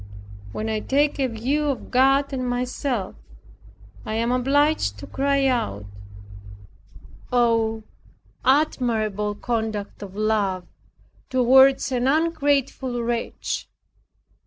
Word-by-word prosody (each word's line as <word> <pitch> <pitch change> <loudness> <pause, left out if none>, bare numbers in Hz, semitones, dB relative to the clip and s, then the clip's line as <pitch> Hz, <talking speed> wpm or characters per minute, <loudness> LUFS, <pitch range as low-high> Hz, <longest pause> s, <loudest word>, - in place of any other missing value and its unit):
When 215 - -4
I 220 -1 -1
take 285 +6 +1
a 265 - +2
view 260 +6 -1
of 275 -3 -3
God, 270 +2 +3
and 255 -2 -2
myself, 245 -3 -2 0.9
I 215 - -4
am 230 +2 0
obliged 270 - +1
to - - -8
cry 275 0 0
out, 105 - -1 1.5
"Oh, 230 -2 +2 0.6
admirable 225 -7 +1
conduct 220 -3 -3
of 195 -1 -9
Love 205 -4 0 0.6
toward 265 +1 +5
an 250 0 0
ungrateful 280 -5 0
wretch! 235 0 -3
245 Hz, 100 wpm, -23 LUFS, 220-275 Hz, 1.5 s, toward